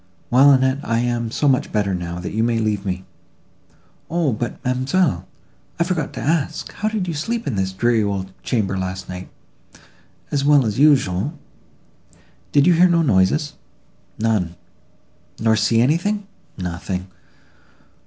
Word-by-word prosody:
"Well, 135 +3 +7
Annette, 130 0 +3
I 115 -4 -1
am 120 0 0
now - - -4
so 145 +5 0
much 135 +1 +2
better, 100 -3 0
that 90 0 -4
you 110 - 0
may 115 0 +1
leave 105 -2 -1
me." 95 0 -3 1.0
"O, 165 -5 +1
but, 115 +1 -4
ma'amselle, 130 - +1 0.5
I - - +4
forgot 170 -4 -2
to - - -6
ask—how 160 +7 -1
did 215 -4 -2
you 170 - -2
sleep 230 +10 -3
in 135 - -2
this 95 -2 -1
dreary 115 +4 +2
old 100 -2 -2
chamber 105 -5 -1
last 95 0 -4
night?"—"As 90 +8 -9
well 145 -2 +5
as 110 +2 -2
usual."—"Did 145 - -1
you 180 - +6
hear 180 +2 +5
no 170 -1 +3
noises?"—"None."—"Nor 110 - -2
see 110 +2 +2
anything?"—"Nothing." 125 - -2
120 Hz, 130 wpm, -21 LUFS, 95-150 Hz, 1.0 s, Well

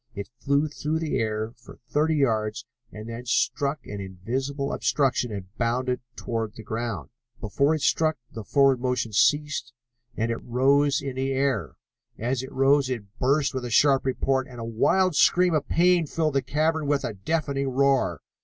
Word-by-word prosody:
It 100 +1 -6
flew 140 +4 +1
through 150 +1 -3
the 160 -1 -1
air 110 0 -2
for 120 - -14
thirty 155 +2 +1
yards 110 -6 0 0.3
and 110 +1 -9
then 115 +2 -7
struck 140 +3 0
an 105 -1 -6
invisible 130 +10 -3
obstruction 130 -4 +1
and 100 0 -8
bounded 125 +2 0
toward 115 -2 -4
the 110 - -10
ground. 115 -1 -4 0.3
Before 140 +8 +1
it 155 - -4
struck 155 +1 +2
the 115 - -7
downward 135 +2 +3
motion 125 -3 -1
ceased, 145 +5 +1 0.4
and 115 +1 0
it 115 - -3
rose 140 +3 +2
in 135 -2 -5
the 135 +1 -1
air. 130 - -1 0.4
As 125 +2 -1
it 130 - -8
rose 135 0 +3
it 110 -4 -6
burst 140 +3 +2
with 130 -1 -3
a 120 - -4
sharp 135 +3 +4
report, 130 0 0
and 125 -2 -11
a 115 - -5
wild 180 +11 +2
scream 180 +2 +4
of 150 -2 0
pain 175 -1 +3
filled 155 0 -1
the 135 - +2
cavern 155 +2 0
with 145 -1 +1
a 120 -4 -3
deafening 140 - -2
roar. 135 +1 +1
130 Hz, 175 wpm, -25 LUFS, 115-145 Hz, 0.4 s, sharp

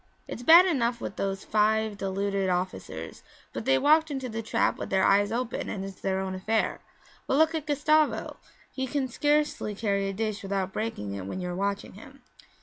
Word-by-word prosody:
'It's - - -6
bad 335 +8 +8
enough 245 -9 0
with - - -6
those 195 -1 -3
five 215 0 +1
deluded 195 0 -1
officers, 180 - -4 0.3
but - - -5
they 135 - +4
walked 315 - +4
into 265 -3 -3
the 225 -1 -4
trap 220 - 0
with - - -5
their 190 0 +2
eyes 205 +1 +4
open 240 +1 -3
and 195 -1 -4
it's 195 -1 -10
their 190 0 0
own 190 0 -3
affair. 215 +4 -1 0.5
But 270 - +1
look 320 +1 +4
at 310 -2 -3
Gustavo; 305 +1 +1 0.3
he 265 0 -3
can 275 0 -1
scarcely 295 -5 0
carry 200 -2 0
a - - -4
dish 215 +1 -3
without 195 -1 -2
breaking 105 - -3
it 95 -1 -6
when 185 - -4
you 180 -1 -4
are 175 - -4
watching 200 +1 -2
him. 265 +8 -14
210 Hz, 195 wpm, -27 LUFS, 195-265 Hz, 0.5 s, bad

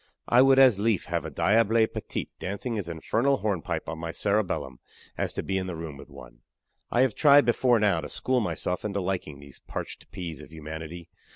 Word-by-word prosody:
I 120 +1 +6
would 135 0 +6
as 130 -7 +6
lief 110 -3 +1
have - - -2
a - - -4
diable 110 +1 +3
petit - - -5
dancing 100 +6 -4
his 100 -6 -3
infernal 115 - +1
hornpipe 90 -5 -2
on 80 +2 -5
my 80 0 -4
cerebellum 100 - -1 0.4
as - - -2
to - - -3
be 95 0 -1
in 95 - -4
the 90 - -4
room 80 -3 -6
with 70 - -12
one. - - -13 0.5
I 120 - +2
have 130 -4 +3
tried 145 0 +6
before 120 0 +3
now 100 -6 +2
to - - -7
school 130 -1 0
myself 90 -3 -2
into 100 -1 -2
liking 90 -6 -3
these 70 -2 -14
parched - - -6
peas 85 -5 -6
of - - -13
humanity. 80 +2 -8
95 Hz, 200 wpm, -27 LUFS, 80-115 Hz, 0.5 s, I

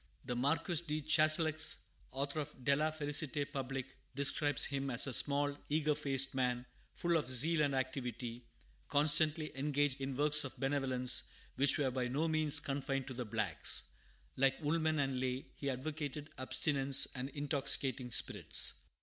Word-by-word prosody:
The 125 - -3
Marquis 155 +6 0
de 150 0 -2
Chastellux, 155 +1 +3 0.3
author 140 +3 -3
of 145 -4 -7
De 140 - +4
la 155 +2 +1
Felicite 145 -1 -1
Publique, 135 -1 -4 0.2
describes 145 +1 +3
him 140 -1 -3
as 125 -1 +4
a 135 - -3
small, 145 +1 +2
eager 150 0 +1
faced 135 -2 -1
man, 125 -1 -1 0.3
full 170 -1 +1
of 150 -5 -3
zeal 150 +6 +3
and 140 -2 +1
activity, 125 -2 -4 0.4
constantly 155 +1 +3
engaged 145 0 0
in 135 0 -3
works 150 +1 +4
of 135 - -7
benevolence, 135 -2 +1 0.3
which 140 +1 +3
were 140 -3 0
by 125 -1 -2
no 145 +6 -1
means 155 -2 +3
confined 135 -1 -3
to - - -5
the 125 0 -5
blacks. 105 - 0 0.5
Like 135 0 +2
Woolman 160 +1 +1
and 135 -3 -1
Lay, 130 +1 -2
he 140 - -4
advocated 145 +2 -5
abstinence 135 +1 +1
from 130 +1 -6
intoxicating 135 -3 0
spirits. - - +2
140 Hz, 150 wpm, -35 LUFS, 130-150 Hz, 0.5 s, De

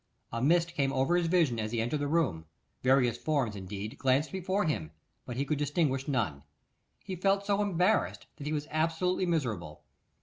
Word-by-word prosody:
A 115 - -3
mist 170 +4 +3
came 140 -4 +1
over 135 +6 +2
his 175 -1 +2
vision 165 -9 +2
as 110 0 -2
he 120 - -1
entered 120 +7 0
the 145 - -1
room; 140 - +1 0.4
various 125 -3 +3
forms, 140 -9 0
indeed, 100 +2 -6
glanced 135 +4 +2
before 190 +1 0
him, 85 - -1 0.4
but 125 - -5
he 140 - 0
could 150 0 -1
distinguish 145 -2 0
none. 110 - -1 0.6
He 190 - -5
felt 195 +2 +1
so 200 0 +2
embarrassed, 200 +1 +1
that 145 -2 -6
he - - -1
was 150 0 -2
absolutely 165 +4 +1
miserable. 105 - -2
145 Hz, 180 wpm, -30 LUFS, 120-170 Hz, 0.6 s, mist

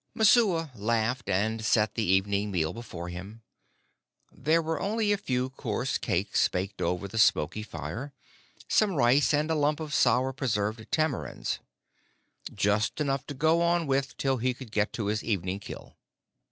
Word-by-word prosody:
Messua 195 - +4
laughed, 115 +2 -1
and 110 +4 0
set 110 0 +2
the 115 - -2
evening 100 +2 +1
meal 80 -5 -1
before 90 -7 -7
him. 95 +6 -9 0.9
There 155 +5 +1
were 165 0 -2
only 215 +1 0
a - - +4
few 130 -8 -2
coarse 130 - -2
cakes - - +1
baked 95 +2 -4
over 90 +2 -1
the 110 +3 -4
smoky 105 0 +3
fire, 90 - -6 0.6
some 205 -4 +2
rice, 130 +1 +4
and 150 +2 +1
a - - +2
lump 150 0 +1
of 155 -2 -5
sour 130 +1 +3
preserved 110 -4 -2
tamarinds 155 -4 -1 0.9
just 105 +6 0
enough 140 -3 -1
to 145 - -6
go 160 +4 +3
on 170 0 +2
with 135 -2 -1
till 135 -1 +1
he 125 +1 0
could 125 -4 -11
get 105 -1 +1
to 110 - -3
his 105 +1 -1
evening 95 -3 -2
kill. 105 - -10
120 Hz, 160 wpm, -28 LUFS, 105-150 Hz, 0.9 s, Messua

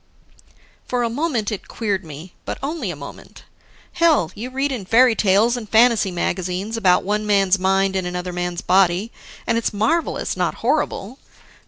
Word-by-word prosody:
For 250 -1 0
a 230 - -1
moment, 250 -5 -1
it 210 - -6
queered 200 -4 -2
me, 160 +3 -10
but - - -5
only 285 - -3
a 175 - -4
moment. 140 -1 -11 0.5
Hell, 315 - +3
you 230 +5 -6
read 270 +2 -1
in 245 -7 -4
fairy 235 +5 +5
tales 215 +3 +3
and 225 -4 -7
fantasy 225 -3 +4
magazines 185 +4 -3
about 185 -5 +3
one 210 +2 -1
man's 195 -2 +3
mind 195 +1 +1
in 185 -2 -1
another 180 0 -4
man's 175 0 -3
body, 190 +3 +2 0.3
and 230 -1 +1
it's 230 - -2
marvelous, 310 +12 -1
not - - -1
horrible. 230 +8 -1
205 Hz, 165 wpm, -21 LUFS, 185-235 Hz, 0.5 s, fairy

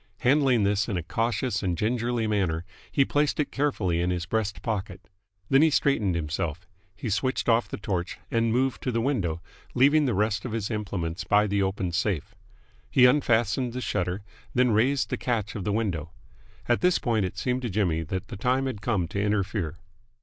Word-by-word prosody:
Handling 130 -3 +4
this 100 +2 +1
in 100 - -1
a 85 - -3
cautious 115 +4 -1
and 90 -3 -1
gingerly 120 +2 0
manner, 95 -6 0 0.3
he 135 - +3
placed 145 +1 +1
it 150 - 0
carefully 105 -12 0
in 90 - 0
his 90 -2 -1
breast 105 +2 -2
pocket. 100 -5 -4 0.4
Then 135 +4 +5
he 160 - +6
straightened 115 - +2
himself. 80 +1 -3 0.3
He 105 - -6
switched 130 +6 0
off 115 0 +3
the - - -5
torch, 95 -3 -3
and 115 -1 +2
moved 130 +2 +1
to 130 - -1
the 115 - 0
window, 100 - -1 0.3
leaving 145 +4 +5
the 120 -6 0
rest 105 0 0
of 120 - -5
his 110 -2 -2
implements 95 -5 -3
by 105 +1 +3
the 100 -1 0
open 95 -2 -1
safe. 90 -2 -1 0.6
He 125 - +6
unfastened 120 -2 +2
the 125 - -3
shutter, 90 -2 -2 0.3
then 125 -1 +4
raised 125 +6 +2
the - - 0
catch 110 -5 -2
of 100 -4 -5
the 105 - 0
window. 95 -8 -1 0.6
At 120 - +2
this 180 0 +4
point 115 -4 0
it 90 - -4
seemed 125 0 -1
to 120 - -3
Jimmy 90 -5 +1
that 95 +4 -4
the 115 - -6
time 125 +5 +1
had 125 -7 -4
come 100 -6 0
to 100 - -2
interfere. 100 -5 -1
105 Hz, 195 wpm, -26 LUFS, 95-125 Hz, 0.6 s, he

